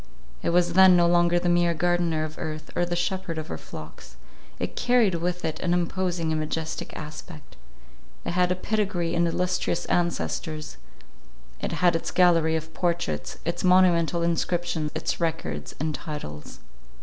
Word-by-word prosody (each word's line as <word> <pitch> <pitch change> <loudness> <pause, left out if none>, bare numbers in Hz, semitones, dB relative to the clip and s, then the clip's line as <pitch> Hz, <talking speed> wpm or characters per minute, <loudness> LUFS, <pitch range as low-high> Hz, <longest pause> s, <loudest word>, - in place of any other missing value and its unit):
It - - 0
was 175 0 +2
then 190 0 +8
no 175 - +5
longer 175 0 +4
the 175 - 0
mere 175 -1 +3
gardener 175 -2 +1
of 155 0 -5
earth, 155 -1 -5
or 175 0 +1
the 175 - -1
shepherd 175 -1 -2
of 155 - -5
her 80 - -4
flocks; 75 -5 -11 0.4
"it - - -4
carried 245 -6 +3
with 175 +1 -2
it 160 - -3
an 175 -1 +1
imposing 175 -1 -1
and 155 - 0
majestic 155 +1 -3
aspect; 155 +1 -9 0.7
it - - -1
had 180 +1 +2
a - - +2
pedigree 185 -4 -1
and 170 0 +2
illustrious 180 0 -1
ancestors; 160 -3 -2 0.8
it - - -3
had 175 -2 +3
its 165 - -2
gallery 165 -3 +4
of 160 0 -4
portraits, 80 - -2
its 170 +3 -2
monumental 175 -2 +4
inscriptions, 170 -2 -1
its 160 - -2
records 160 - -3
and 155 +2 -1
titles." 75 - -7
170 Hz, 160 wpm, -26 LUFS, 160-175 Hz, 0.8 s, then